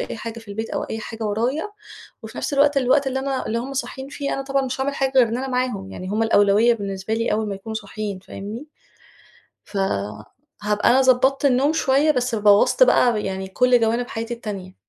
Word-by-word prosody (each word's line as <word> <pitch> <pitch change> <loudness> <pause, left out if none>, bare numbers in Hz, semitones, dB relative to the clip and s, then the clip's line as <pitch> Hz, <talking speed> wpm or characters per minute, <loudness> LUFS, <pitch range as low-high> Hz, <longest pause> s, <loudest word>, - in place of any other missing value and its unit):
أي - - -5
حاجة 230 +1 -7
في 225 -2 -15
البيت 220 +2 -5
أو - - -2
أي 220 - -5
حاجة 225 0 -6
ورايا، 245 - -1 0.5
وفي 220 +1 -9
نَفْس - - -2
الوقت 285 0 +3
الوقت 270 +1 +3
اللي 265 0 -1
أنا 270 0 -2
اللي 230 +1 -1
هُم 260 +3 -5
صاحيين 265 0 -5
فيه 280 -1 -3
أنا 275 - -3
طبعًا 270 0 0
مش 260 +1 -4
هاعمل 280 +1 -1
حاجة 270 -1 -1
غير 245 -3 +6
إن 230 - -2
أنا 265 - -4
معاهم، 250 -7 -2
يعني 185 - -7
هُم 215 +3 0
الأولوية 215 +1 +4
بالنسبة 200 0 -4
لي 230 -1 -1
أول 215 0 -1
ما 200 - -3
يكونوا 220 +3 -8
صاحيين، 210 -1 -5
فاهمني؟ 205 +7 -8 1.0
فهابقى 205 - -3
أنا 260 +2 +5
ضبطت 265 +2 +3
النوم 275 +3 +3
شوية 290 0 +3
بس 250 -4 -1
بوّظْت 210 - +5
بقى 235 - +3
يعني 190 0 -4
كُلّ 250 +4 +3
جوانب 235 +2 +1
حياتي 230 +1 -4
التانية. 195 -5 -7
230 Hz, 200 wpm, -22 LUFS, 210-265 Hz, 1.0 s, غير